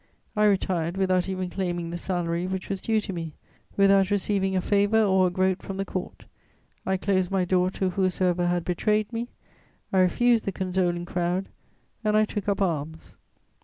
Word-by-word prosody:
I 210 0 +3
retired 185 -4 +1
without 185 -1 +1
even 185 -1 -3
claiming 175 -3 -3
the - - -4
salary 175 -1 -2
which 190 0 -4
was 195 -2 -3
due 220 -1 +1
to 195 - -5
me, 165 -3 -5 0.4
without 195 -1 +5
receiving 195 -1 0
a - - +3
favour 205 +3 +3
or 190 -2 +3
a - - +1
groat 185 +1 0
from 195 - -6
the 195 - -2
Court; 185 -1 -6 0.6
I 190 0 +1
closed 185 -1 0
my 190 -2 +1
door 180 0 +2
to 190 0 -2
whosoever 180 -1 +1
had 175 -1 0
betrayed 210 +5 0
me; 230 +1 -3 0.7
I 190 - +4
refused 230 +5 +3
the 195 - -1
condoling 180 -2 -1
crowd, 175 +2 -1 0.5
and 215 0 +2
I 215 - +4
took 210 -1 -4
up 200 0 +1
arms. 160 -2 -4
190 Hz, 180 wpm, -26 LUFS, 180-200 Hz, 0.7 s, without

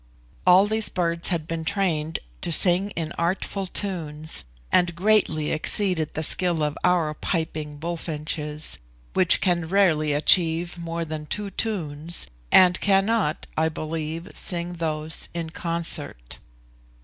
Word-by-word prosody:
All 185 +2 +7
these 220 +1 0
birds 170 -2 0
had 165 -4 -1
been 165 -1 -3
trained 165 -4 -1 0.2
to - - -1
sing 180 +4 +4
in 165 -1 -3
artful 190 +3 -2
tunes, 155 - -2 0.3
and 175 -2 +2
greatly 180 -6 +2
exceeded 160 0 0
the 160 - -1
skill 175 0 +2
of 150 0 -1
our 175 -4 +2
piping 155 -3 -3
bullfinches, 155 -2 -3 0.3
which 185 -2 +5
can 175 -3 +1
rarely 165 -6 +3
achieve 170 +3 +3
more 170 0 -4
than 155 -1 -6
two 205 +3 -4
tunes, 170 -6 -3 0.3
and 180 -1 +6
cannot, 195 -4 +1
I 160 0 +1
believe, 160 +2 -5
sing 175 -1 +1
those 155 -1 -1
in 165 -2 -4
concert. 165 - -2
170 Hz, 125 wpm, -24 LUFS, 155-180 Hz, 0.3 s, All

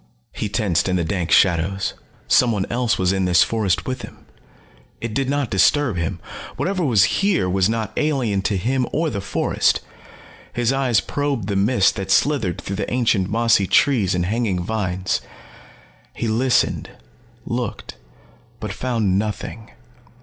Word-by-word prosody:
He 105 - -3
tensed 95 -5 0
in 90 - +1
the 90 - +1
dank 85 0 -2
shadows. 95 +2 +2 0.3
Someone 110 -6 +3
else 120 -1 +1
was 95 0 +1
in 95 -1 0
this 90 -3 +5
forest 105 -6 0
with 130 -1 -4
him. - - -12 0.7
It 115 -2 -5
did 135 +1 -1
not 140 -3 -1
disturb 125 +4 +3
him. 85 +2 -2 0.4
Whatever 185 0 -1
was 115 - +4 0.2
here 195 - +2
was 95 +2 +2
not 110 -1 -2
alien 130 -10 0
to 100 +1 0
him 125 +6 0
or 160 0 0
the 100 -4 -3
forest. 100 - +1 0.7
His 120 +1 +1
eyes 130 -6 +2
probed 140 -7 -2
the 100 - -1
mist 100 +1 +2
that 95 -1 -4
slithered 115 - +2
through 95 - -5
the 100 - -3
ancient 115 -6 +1
mossy 115 -3 +2
trees 105 -9 +3
and 90 -1 0
hanging 100 -3 -1
vines. 95 -2 -2 0.9
He 115 - -2
listened, 120 +2 +1 0.6
looked, 120 -2 -4 0.7
but 105 -2 -5
found 110 -6 0
nothing. 110 +1 -5
110 Hz, 150 wpm, -21 LUFS, 95-125 Hz, 0.9 s, this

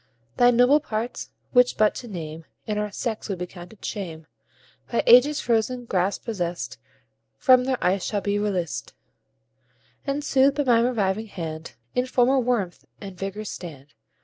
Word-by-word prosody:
Thy 245 - +6
nobler 245 +5 +5
parts, 230 -4 -4 0.2
which 250 -1 +4
but 215 -1 +4
to 245 - -8
name 160 -5 -7 0.2
In 210 -1 -2
our 210 0 -2
sex 220 +1 -4
would 195 - -2
be 180 - -3
counted 180 +4 -12
shame, 165 -7 -5 0.7
By 235 - +1
ages 265 +5 +6
frozen 240 +1 0
grasp 190 -2 -1
possest, 175 -6 -3 0.6
From 255 -2 +5
their 260 -1 0
ice 185 +1 +2
shall 205 -2 -1
be 205 +1 0
released, 185 -7 -2 1.1
And, 280 +1 -1
soothed 275 0 +3
by 290 - +2
my 240 -4 +4
reviving 215 -2 0
hand, 160 -4 -6 0.2
In 250 +1 0
former 255 +1 +3
warmth 230 -8 -1 0.2
and 195 -2 -8
vigour 195 +3 -5
stand. 150 -8 -9
215 Hz, 155 wpm, -24 LUFS, 185-250 Hz, 1.1 s, Thy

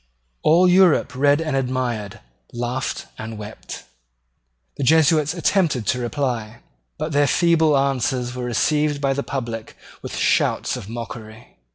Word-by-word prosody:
All 175 +4 +5
Europe 180 -5 +4
read 145 +2 +3
and 155 -4 -2
admired, 125 -6 -2 0.3
laughed 120 +2 -3
and 110 0 -6
wept. 105 +1 -9 0.9
The 140 - -2
Jesuits 155 +1 +3
attempted 165 - +1
to 125 - 0
reply: 120 -3 -3 0.4
but 155 - -3
their 145 0 +3
feeble 160 -1 +3
answers 130 -2 0
were 125 0 -4
received 150 +4 +1
by 135 -1 +1
the 140 - -2
public 120 -6 -5 0.2
with - - -7
shouts - - +1
of 100 - -8
mockery. 115 - -9
135 Hz, 135 wpm, -21 LUFS, 120-150 Hz, 0.9 s, All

